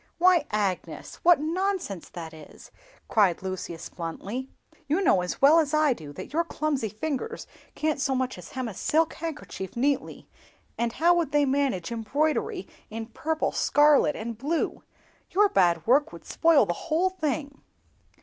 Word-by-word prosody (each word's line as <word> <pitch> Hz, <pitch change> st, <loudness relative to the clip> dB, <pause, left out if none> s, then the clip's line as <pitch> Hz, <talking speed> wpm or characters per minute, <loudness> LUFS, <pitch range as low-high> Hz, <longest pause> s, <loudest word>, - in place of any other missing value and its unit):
"Why, 350 Hz, -3 st, +4 dB
Agnes, 200 Hz, -4 st, -3 dB
what 345 Hz, -2 st, +6 dB
nonsense 335 Hz, -, -2 dB
that 165 Hz, -2 st, -8 dB
is!" 155 Hz, -1 st, -14 dB, 0.4 s
cried 195 Hz, -5 st, +2 dB
Lucius, 180 Hz, -3 st, -5 dB
bluntly; 200 Hz, +10 st, -5 dB, 0.4 s
"you 310 Hz, +6 st, +1 dB
know, 195 Hz, -, +4 dB
as 180 Hz, +8 st, -5 dB
well 305 Hz, +4 st, +8 dB
as 305 Hz, -1 st, +1 dB
I 305 Hz, -3 st, +4 dB
do, 155 Hz, -10 st, -10 dB
that 185 Hz, -, -9 dB
your 335 Hz, +2 st, +2 dB
clumsy 300 Hz, -8 st, -2 dB
fingers 315 Hz, -, -4 dB, 0.3 s
can't 305 Hz, -2 st, -1 dB
so 265 Hz, 0 st, +1 dB
much 255 Hz, 0 st, -1 dB
as -, -, -12 dB
hem 260 Hz, -2 st, -3 dB
a 220 Hz, -, -6 dB
silk 320 Hz, -, +1 dB
handkerchief 295 Hz, -, -6 dB
neatly, 280 Hz, +3 st, -1 dB, 0.5 s
and 235 Hz, 0 st, -1 dB
how 340 Hz, +2 st, +4 dB
would 340 Hz, -5 st, 0 dB
they 295 Hz, 0 st, +3 dB
manage 265 Hz, -9 st, 0 dB
embroidery 280 Hz, +8 st, -1 dB, 0.2 s
in 225 Hz, +1 st, -5 dB
purple, 315 Hz, +6 st, -1 dB
scarlet, 295 Hz, 0 st, +4 dB
and 225 Hz, 0 st, -6 dB
blue? 305 Hz, +5 st, -1 dB, 0.5 s
Your 410 Hz, +3 st, +4 dB
bad 175 Hz, -, +2 dB
work 290 Hz, +6 st, +3 dB
would -, -, -12 dB
spoil 325 Hz, -8 st, +4 dB
the 175 Hz, -, -1 dB, 0.2 s
whole 350 Hz, +4 st, +2 dB
thing." 295 Hz, -5 st, -3 dB
280 Hz, 160 wpm, -26 LUFS, 210-315 Hz, 0.5 s, well